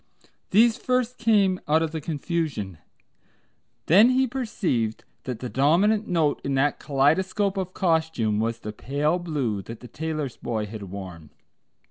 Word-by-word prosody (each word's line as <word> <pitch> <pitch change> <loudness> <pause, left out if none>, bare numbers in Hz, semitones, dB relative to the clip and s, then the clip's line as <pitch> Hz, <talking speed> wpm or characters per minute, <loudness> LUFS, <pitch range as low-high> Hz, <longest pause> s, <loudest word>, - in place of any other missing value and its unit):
These 225 +3 +5
first 250 -1 -1
came 205 -5 +3
out 160 +2 +3
of 160 - -2
the 160 -1 -4
confusion. 145 - -3 1.1
Then 205 +9 +6
he 260 +1 +3
perceived 195 - -2 0.2
that 125 -3 -5
the 125 - -3
dominant 185 - +2
note 165 -5 +1
in 140 - -1
that 140 +2 +1
kaleidoscope 185 +8 +1
of 185 -1 -4
costume 160 - +1
was 115 +1 -2
the 105 - -6
pale 145 +9 -1
blue 140 - -2
that 115 +3 -9
the 125 - -11
tailor's 155 -1 -4
boy 110 -3 -3
had 105 +1 -8
worn. 90 -5 -8
155 Hz, 145 wpm, -25 LUFS, 115-190 Hz, 1.1 s, Then